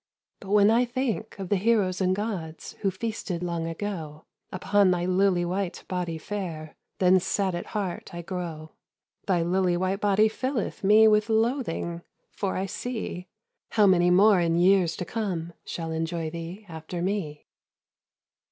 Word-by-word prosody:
"But 195 - -11
when 205 +1 +5
I 235 +2 +4
think 245 -3 -3
of 190 -2 -6
the 205 - +3
heroes 195 -3 +1
and 185 0 +2
gods, 190 -7 -5
Who 195 - +2
feasted 190 -3 -4
long 170 -2 -2
ago, 165 -4 -5 0.3
Upon 200 +1 +3
thy 175 -1 +1
lily 185 -1 +2
white 185 +1 -3
body 180 -3 -3
fair, 160 -4 -6 0.2
Then 185 0 +5
sad 190 +1 -1
at 175 - -4
heart 200 -5 -4
I 175 0 -6
grow. 165 -4 -6 0.6
Thy 180 -4 +2
lily 180 0 +1
white 185 +2 -1
body 205 +1 +4
filleth 250 0 -3
me 215 +3 +7
With 215 +1 +3
loathing, 220 -7 0 0.3
for 195 -2 -2
I 190 - -1
see 205 -4 -5 0.5
How 210 - +5
many 180 -2 +5
more 195 +2 +6
in 165 -1 +1
years 180 -1 +4
to 180 - -4
come 180 -7 -3
Shall 165 -1 -5
enjoy 160 0 -2
thee, 170 +5 -7
after 165 +1 -6
me." 180 -6 -3
185 Hz, 155 wpm, -26 LUFS, 170-205 Hz, 0.6 s, me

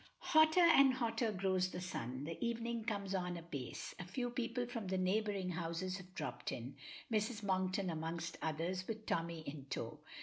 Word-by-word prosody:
Hotter 315 +3 +7
and 275 -6 +8
hotter 230 -2 +1
grows 185 -1 +2
the 180 - -5
sun; 130 -7 -3
the 165 +7 -4
evening 235 0 -1
comes 200 -3 -1
on 180 -2 -1
apace; 150 -7 -5
a - - -3
few 240 +7 -2
people 245 0 -1
from 230 -4 -4
the 190 0 0
neighboring 195 0 +1
houses 170 +2 -2
have 185 -1 -12
dropped 155 - -3
in; 125 +3 -5 0.4
Mrs. 215 0 +1
Monkton 185 -1 +1
amongst 165 +1 -3
others, 170 +4 -1
with 220 -1 -4
Tommy 165 -1 -1
in 140 -2 -6
tow. - - -3
185 Hz, 170 wpm, -38 LUFS, 170-225 Hz, 0.4 s, and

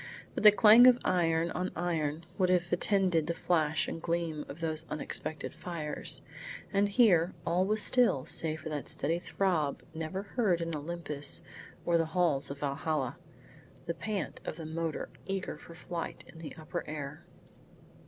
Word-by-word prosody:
But - - -3
the 210 0 +10
clang 225 +3 +8
of 250 -1 +7
iron 165 -2 +2
on 185 +1 -2
iron 165 -2 -2
would 185 -1 +3
have 175 -1 +1
attended 180 -3 +2
the 170 - -1
flash 160 -4 +1
and 165 - -5
gleam 165 -3 -2
of 145 - -8
those 160 -1 0
unexpected 155 +1 -3
fires, 160 -4 -3 0.5
and 200 +1 +3
here 190 -6 +4
all 180 +3 +1
was 215 +1 +3
still 235 - +3
save 160 -1 +2
for 160 - -6
that 150 -2 -4
steady 165 +4 -1
throb 175 -6 -1
never 160 +4 -4
heard 200 -4 +1
in 165 -1 -3
Olympus 150 -2 -3 0.4
or 170 -1 +3
the 165 - +1
halls 160 -6 +2
of 140 0 -7
Valhalla, 140 -1 -2 0.7
the 170 - -2
pant 200 +1 -4
of - - -5
the 160 -1 -8
motor 160 0 -3 0.2
eager 195 -1 -3
for 170 - -13
flight 170 -1 -6
in 160 - -13
the 160 - -8
upper 155 -1 -5
air. 150 +1 -6
165 Hz, 165 wpm, -31 LUFS, 155-180 Hz, 0.7 s, the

